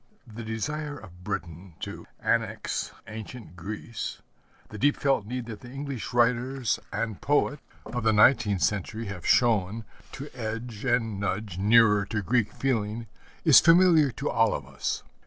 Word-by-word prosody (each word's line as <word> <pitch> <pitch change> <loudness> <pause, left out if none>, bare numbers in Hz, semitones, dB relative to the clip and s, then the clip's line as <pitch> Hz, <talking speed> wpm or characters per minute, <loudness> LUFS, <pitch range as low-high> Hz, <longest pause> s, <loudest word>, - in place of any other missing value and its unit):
The 115 -1 -9
desire 145 +7 -3
of 90 -7 -14
Britain 85 0 -5
to - - -7
annex - - -1 0.2
ancient 110 -3 -9
Greece, 105 +5 -6 0.5
the 105 - -8
deep 145 +6 +3
felt 135 -7 +1
need 125 +1 -4
that 110 -3 -7
the 120 - -12
English 135 -2 -5
writers 125 0 +1
and 105 0 -3
poets 145 0 +1 0.2
of 120 - -4
the 110 - +4
nineteenth 105 - +4
century 105 +6 -1
have 95 -4 -6
shown 110 -2 +2 0.3
to 140 +1 -8
edge 115 0 -5
and 115 -5 +1
nudge 100 -2 -3
nearer 105 0 +5
to 105 -2 -2
Greek 115 0 +1
feeling, 115 -3 -1 0.4
is - - +9
familiar 165 -3 +6
to - - -4
all - - +2
of - - -6
us. - - -3
115 Hz, 150 wpm, -27 LUFS, 105-125 Hz, 0.5 s, is